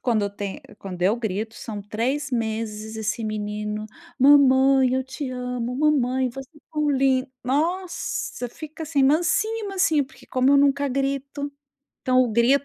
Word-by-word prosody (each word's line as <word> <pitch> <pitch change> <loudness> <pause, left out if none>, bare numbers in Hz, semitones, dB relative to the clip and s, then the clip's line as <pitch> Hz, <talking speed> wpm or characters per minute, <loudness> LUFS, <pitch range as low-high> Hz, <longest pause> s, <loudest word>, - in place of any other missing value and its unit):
Quando 230 -4 +1
o 200 - -1
tem 200 -1 -6 0.2
quando 180 -2 -7
eu 195 +5 +4
grito, 220 -1 -3
são 210 -3 -6
3 250 +8 -2
meses 220 -2 -3
esse 220 +1 -2
menino: 210 0 -3 0.3
"Mamãe, 265 -1 +6
eu 260 0 0
te 265 +1 -5
amo, 250 -1 -3
mamãe, 260 -3 +2
você 270 +2 -9
é - - -17
tão 300 -1 0
lin". 265 -1 +2 0.2
Nossa! 320 -2 -2
Fica 310 +5 -9
assim, 295 -3 +1
"mansinho, 350 +10 +2
mansinho", 345 -7 +2
porque - - -18
como 255 +1 +2
eu 280 - +6
nunca 280 0 +3
grito, 275 +2 -2 0.5
então 255 0 +3
o 250 - 0
grito 240 +5 +3
260 Hz, 155 wpm, -24 LUFS, 225-285 Hz, 0.5 s, Mamãe